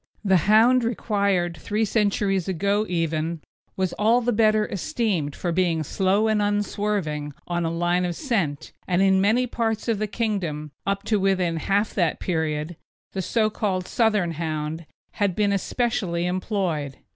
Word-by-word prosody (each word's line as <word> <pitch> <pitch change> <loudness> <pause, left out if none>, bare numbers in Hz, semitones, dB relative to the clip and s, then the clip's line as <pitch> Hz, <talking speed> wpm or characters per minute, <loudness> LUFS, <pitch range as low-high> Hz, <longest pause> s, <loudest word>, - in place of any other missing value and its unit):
The 190 -1 +5
hound 235 +4 +6
required 200 -6 0
three 215 +6 -1
centuries 200 -3 +1
ago 200 +4 0
even 165 -1 -1 0.4
was 185 -2 0
all 225 +3 +4
the 245 0 0
better 215 -1 +3
esteemed 190 -7 -2
for 175 - -2
being 170 -2 +1
slow 195 +7 +1
and 215 -1 +2
unswerving 205 -7 -1
on 175 -1 -1
a - - 0
line 175 +2 +1
of 175 -1 -2
scent, 195 - -2
and 180 +1 +2
in 190 -1 +4
many 225 +6 +3
parts 225 -2 -2
of 225 -3 +1
the 215 - -1
Kingdom, 190 -9 -2 0.2
up 195 0 0
to 215 -2 +1
within 185 -3 +1
half 200 +6 0
that 175 -5 0
period, 160 -1 -2 0.4
the 190 - -2
so 215 +3 +1
called 190 -4 -1
Southern 210 -7 +1
Hound 155 0 -4 0.2
had 200 -4 0
been 205 -1 +2
especially 195 -4 -1
employed. 180 -7 -2
195 Hz, 155 wpm, -24 LUFS, 170-215 Hz, 0.4 s, hound